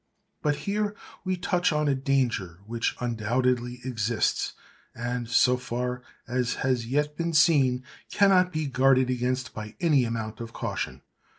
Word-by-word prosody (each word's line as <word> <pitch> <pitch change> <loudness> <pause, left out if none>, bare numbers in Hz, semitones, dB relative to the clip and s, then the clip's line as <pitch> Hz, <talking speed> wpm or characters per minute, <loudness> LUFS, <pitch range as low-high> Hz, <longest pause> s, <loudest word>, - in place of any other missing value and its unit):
But 150 -1 +1
here 205 +1 -1 0.3
we 185 -1 -1
touch 180 -1 +1
on 150 0 +1
a 140 - +3
danger 130 -10 0
which 115 +1 -1
undoubtedly 125 +1 0
exists, 115 -3 0 0.4
and—so 120 +1 +2
far 125 0 -3 0.3
as 125 0 0
has 125 -3 +1
yet 150 +3 0
been 170 +1 -2
seen—cannot 160 +6 +3
be 155 -2 -2
guarded 130 -1 +3
against 125 +1 -1
by 105 0 -7
any 150 -7 +4
amount 110 -2 -3
of 115 0 -7
caution. - - -4
125 Hz, 130 wpm, -27 LUFS, 120-150 Hz, 0.4 s, any